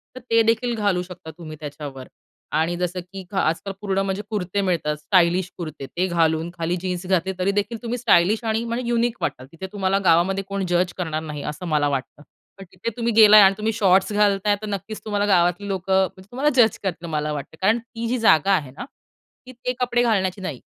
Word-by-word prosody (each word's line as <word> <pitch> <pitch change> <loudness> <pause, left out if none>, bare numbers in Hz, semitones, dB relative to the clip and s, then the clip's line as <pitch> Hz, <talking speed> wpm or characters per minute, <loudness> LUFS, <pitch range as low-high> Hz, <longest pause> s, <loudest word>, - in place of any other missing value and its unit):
तर - - -7
ते 230 0 +5
देखील 235 +2 +1
घालू 200 -4 +1
शकता 175 -3 -10
तुम्ही 155 -2 -9
त्याच्यावर 145 -3 -8 0.4
आणि 160 +3 0
जसं 180 +1 -2
की 190 +2 -9
घा 195 - 0
आजकाल 180 +5 -2
पूर्ण 195 -1 -1
म्हणजे 195 +1 -2
कुर्ते 200 -1 -2
मिळतात, 165 -5 0
स्टायलिश 175 +3 +2
कुर्ते, 155 -5 -6
ते 180 +2 -1
घालून 165 -1 +1
खाली 170 0 -2
जीन्स 180 -1 -3
घातले 190 0 +1
तरीदेखील 205 +4 0
तुम्ही 240 +1 -3
स्टायलिश 215 -1 +3
आणि 225 0 0
म्हणजे 235 +1 -3
युनिक 235 0 +1
वाटाल. 130 - -3
तिथे 190 +3 -7
तुम्हाला 195 -1 +1
गावामध्ये 180 +4 +3
कोण 200 -1 -2
जज 175 0 +1
करणार 160 -4 -2
नाही 150 -2 -6
असं 150 +4 -9
मला 150 -2 +2
वाटतं. 140 +1 -4 0.3
पण 195 - -10
तिथे 185 +5 -4
तुम्ही 235 -1 0
गेलाय 215 -1 +9
आणि 195 0 +6
तुम्ही 220 +1 -1
शॉर्ट्स 195 -1 +3
घालताय 205 0 +2
तर 215 - -5
नक्कीच 205 +2 -5
तुम्हाला 205 -1 0
गावातली 180 0 +2
लोकं 190 0 +1
म्हणजे 185 +2 -12
तुम्हाला 275 +4 +1
जज 225 -4 +4
करतील 175 -3 -3
मला 150 -1 -2
वाटतं. 145 +2 -7
कारण 215 +4 +3
ती 230 0 -7
जी 250 +2 0
जागा 195 -4 +4
आहे 145 -7 -3
ना, 160 - -8 0.6
ती 255 - -10
ते 250 0 -4
कपडे 245 -1 +1
घालण्याची 195 -5 0
नाही. 155 -9 -5
190 Hz, 205 wpm, -22 LUFS, 170-215 Hz, 0.6 s, गेलाय